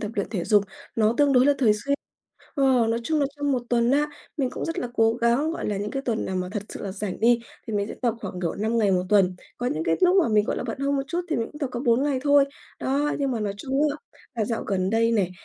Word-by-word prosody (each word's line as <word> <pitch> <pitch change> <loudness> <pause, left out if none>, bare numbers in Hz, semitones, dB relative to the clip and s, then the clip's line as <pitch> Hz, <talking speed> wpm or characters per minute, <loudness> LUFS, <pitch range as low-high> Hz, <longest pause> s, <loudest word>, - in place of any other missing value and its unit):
tập 210 - -3
luyện 200 - -1
thể 185 -7 -2
dục, 205 -2 +4 0.3
nó 220 0 +3
tương 285 -1 +4
đối 255 +1 +5
là 285 - +6
thường 235 -5 +5
xuyên. 280 +7 -1 0.6
Ờ, 265 -5 +3
nói 230 +1 0
chung 315 +2 +1
là 280 - +3
trong 285 -1 0
1 250 - 0
tuần 235 0 +3
á, 295 +2 +2 0.3
mình 265 -4 0
cũng - - -5
rất 330 +2 -3
là 245 - -2
cố 225 -1 +3
gắng, 240 +6 +2
gọi - - -4
là, 205 - -1
những 205 +1 -3
cái 270 - -3
tuần 230 -4 -1
nào 190 - -2
mà 180 0 -2
thật 210 - -3
sự - - -8
là 195 -2 -4
rảnh 200 -2 -5
đi, 235 +1 +4 0.3
thì 225 - -5
mình 205 -1 0
sẽ - - -6
tập 235 -3 +2
khoảng, 185 -3 -6
kiểu, 170 -2 -1
5 220 +3 0
ngày 205 -3 +3
1 180 - +2
tuần, 190 -3 +3 0.2
có 245 - -2
những 160 -9 -1
cái 165 - +2
lúc 365 +1 +5
mà - - 0
mình, 210 -1 +3
gọi - - -2
là, - - -2
bận 235 +1 -4
hơn 280 0 0
một 275 - 0
chút 345 +2 -1
thì 320 - 0
mình 230 - -1
cũng 295 - -10
tập 280 - 0
có 240 - -3
4 240 0 +3
ngày 285 -2 +1
thôi. 285 -1 +5 0.4
Đó, 285 +3 0
nhưng 275 -2 0
mà 235 -4 -2
nói 200 -1 -2
chung 270 +6 -2
á, 285 - -4 0.4
là 225 -3 0
dạo 230 +1 -3
gần 190 -1 0
đây 230 +1 +2
này, 195 -5 +1
235 Hz, 300 wpm, -25 LUFS, 210-275 Hz, 0.6 s, là